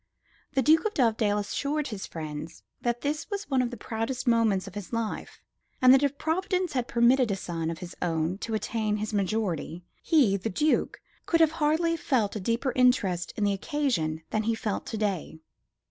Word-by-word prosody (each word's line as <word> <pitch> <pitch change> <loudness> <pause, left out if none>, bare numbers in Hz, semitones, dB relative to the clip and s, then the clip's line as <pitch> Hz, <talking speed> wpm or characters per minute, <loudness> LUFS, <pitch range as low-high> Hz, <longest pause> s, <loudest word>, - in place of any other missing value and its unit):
The 265 - +2
Duke 315 - +5
of 430 - -1
Dovedale 220 -5 +2
assured 285 +8 -2
his 210 -4 -5
friends 155 0 -7 0.2
that 240 0 -1
this 300 +6 -2
was 405 -1 -4
one 265 -1 +3
of 245 - 0
the 240 - -8
proudest 225 +4 -3
moments 225 -5 +3
of 195 - -9
his 205 -2 -7
life, 230 -2 -4 0.4
and 255 0 +7
that 265 - +6
if 285 0 0
Providence 365 +2 -1
had 250 -2 -1
permitted 240 +1 +4
a 200 - +1
son 165 -4 -3
of 165 - -4
his 175 +1 -9
own 165 +2 -1
to 225 0 -3
attain 215 0 -1
his 215 +1 -4
majority, 190 -4 -1 0.2
he, 260 - +3
the 200 +4 -3
Duke, 300 +11 +1 0.3
could 330 - +3
have 320 -2 +5
hardly 325 +3 +2
felt 240 -10 0
a - - -2
deeper 230 +6 -1
interest 200 -9 +2
in 210 - 0
the 200 -1 +2
occasion 190 - -1
than 215 - +1
he 225 +1 0
felt 215 -2 -3
to 225 - -4
day. 195 -7 -2
225 Hz, 190 wpm, -27 LUFS, 195-270 Hz, 0.4 s, and